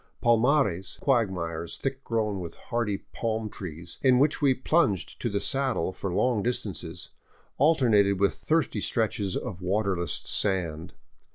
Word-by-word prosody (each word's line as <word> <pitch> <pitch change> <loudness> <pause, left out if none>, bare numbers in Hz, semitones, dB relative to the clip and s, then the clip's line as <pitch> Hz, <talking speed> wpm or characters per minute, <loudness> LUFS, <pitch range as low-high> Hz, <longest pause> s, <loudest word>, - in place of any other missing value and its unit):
Palmares, 120 - +2
quagmires 90 - 0
thick 135 0 -3
grown 110 -4 -1
with 85 -2 -7
hardy 115 -5 -2
palm 110 -2 -2
trees, 85 -2 -8
in 130 -2 +5
which 145 +4 +2
we 135 -3 +4
plunged 130 - +1
to 120 - 0
the 100 -1 -1
saddle 135 -10 0
for 95 - -4
long 115 +4 +1
distances, 90 -7 -3 0.5
alternated 115 - +4
with 100 0 +3
thirsty 160 0 0
stretches 105 -4 0
of 95 -7 -5
waterless 95 -3 0
sand. 85 -4 -1
105 Hz, 130 wpm, -27 LUFS, 90-125 Hz, 0.5 s, in